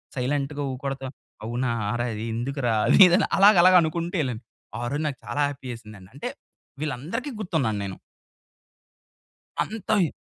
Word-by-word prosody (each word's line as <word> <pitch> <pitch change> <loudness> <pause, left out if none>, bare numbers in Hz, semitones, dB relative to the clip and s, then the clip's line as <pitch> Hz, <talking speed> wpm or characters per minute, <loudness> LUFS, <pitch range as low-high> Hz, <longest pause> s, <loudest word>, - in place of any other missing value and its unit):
సైలెంట్‌గా 140 +2 -1
ఊకొడత 135 +1 -5 0.4
"అవునా 120 +2 -1
అరా? 105 - -2
ఆరె 120 +2 -1
అది 110 +2 -4
ఎందుకురా" 125 -1 -1
అది - - +5
ఇది 175 - +4
అని - - +1
అలాగ 200 +2 +7
అలాగ 185 0 +7
అనుకుంటూ 170 +3 -2
ఎళ్ళాను. 125 -2 -4 0.4
ఆ - - -4
రోజు 150 +2 -1
నాకు 135 -4 -4
చాలా 145 - 0
హ్యాపీ 130 -2 -8
ఏసింది. 110 -3 -12 0.2
అంటే - - -4 0.5
వీళ్ళందరికీ 155 - -3
గుర్తున్నా 160 - 0
నేను. 95 -1 -5 1.7
అం‌తై. 205 -5 0
140 Hz, 145 wpm, -25 LUFS, 120-170 Hz, 1.7 s, అలాగ